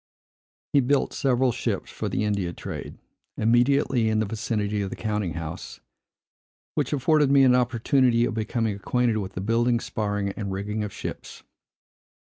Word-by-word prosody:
He 145 - +6
built 140 +2 +1
several 130 -2 +2
ships - - -3
for - - -4
the - - -1
India 100 -5 -1
trade, - - -7 0.4
immediately 120 +1 +3
in 110 - +1
the 110 - +2
vicinity 105 -1 -2
of 100 - -2
the - - -6
counting 105 -6 -2
house; 80 0 -6 0.9
which - - -1
afforded 145 +1 +3
me 140 -1 +6
an 130 -1 +6
opportunity 125 0 +3
of 120 - -2
becoming 110 -1 -1
acquainted 120 +3 0
with 95 -2 -4
the 90 - -4
building, 115 +3 +2
sparring, 105 -3 -2
and 100 0 -5
rigging 105 +3 -3
of 105 - -4
ships. - - -7
110 Hz, 155 wpm, -25 LUFS, 105-125 Hz, 0.9 s, He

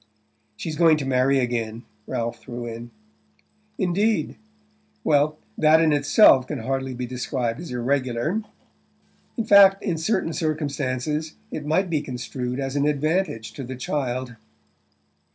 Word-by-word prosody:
"She's 155 +4 -5
going 165 -2 +5
to 145 - -3
marry 135 +1 +2
again," 120 -2 -2 0.2
Ralph 115 0 -3
threw 120 +1 -7
in. 115 +1 -7 0.9
"Indeed? 200 +4 0 0.7
Well, 150 0 +2 0.2
that 155 +1 +6
in 160 -2 +3
itself 140 - +5
can - - -4
hardly 130 +1 -2
be 125 +1 -4
described 125 -1 -3
as 170 - -7
irregular. 130 - -1 1.0
In 230 - 0
fact, 200 -2 +7
in 170 -6 -1
certain 180 -1 0
circumstances 150 -1 -2 0.2
it 150 -1 -5
might 185 +5 +2
be 160 -4 0
construed 125 -1 -5
as 135 0 -3
an 145 +1 +2
advantage 150 -5 -1
to 140 - -7
the 130 +1 -6
child." 130 -1 -3
140 Hz, 135 wpm, -24 LUFS, 125-160 Hz, 1.0 s, fact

